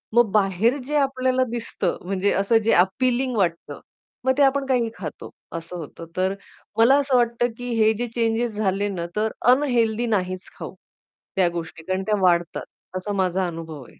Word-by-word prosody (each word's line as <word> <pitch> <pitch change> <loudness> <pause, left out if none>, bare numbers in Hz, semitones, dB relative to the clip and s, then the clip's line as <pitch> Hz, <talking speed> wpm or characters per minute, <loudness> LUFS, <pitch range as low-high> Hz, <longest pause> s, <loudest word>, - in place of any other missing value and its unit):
मग 240 -4 +5
बाहेर 210 +5 +2
जे 300 - -2
आपल्याला 260 -2 +2
दिसतं 225 -6 -2
म्हणजे 195 +1 0
असं 200 +4 +3
जे - - +5
अपीलिंग 255 +5 0
वाटतं, 170 -3 -1 0.5
मग 260 +1 +2
ते - - +3
आपण 275 0 +3
काहीही 245 -4 +1
खातो, 155 -6 -7 0.3
असं 165 +2 -8
होतं. 165 +1 -8
तर 190 +1 +1 0.4
मला 240 +5 +6
असं 275 -2 +1
वाटतं, 240 0 +2
की 245 0 -6
हे 220 +1 +5
जे 245 +1 -2
चेंजेस 230 -1 0
झाले 200 -1 0
ना, 170 -3 -3
तर 215 +1 0 0.2
अनहेल्थी 240 -4 +2
नाहीच 185 0 -3
खाऊ - - -7 0.6
त्या 185 -2 +4
गोष्टी 165 -1 -7
कारण 185 +2 -1
त्या 210 +2 +1
वाढतात, 175 -2 +2 0.4
असा 195 +3 -4
माझा 190 -1 0
अनुभव 165 -2 -7
आहे. - - -15
215 Hz, 170 wpm, -23 LUFS, 185-245 Hz, 0.6 s, मला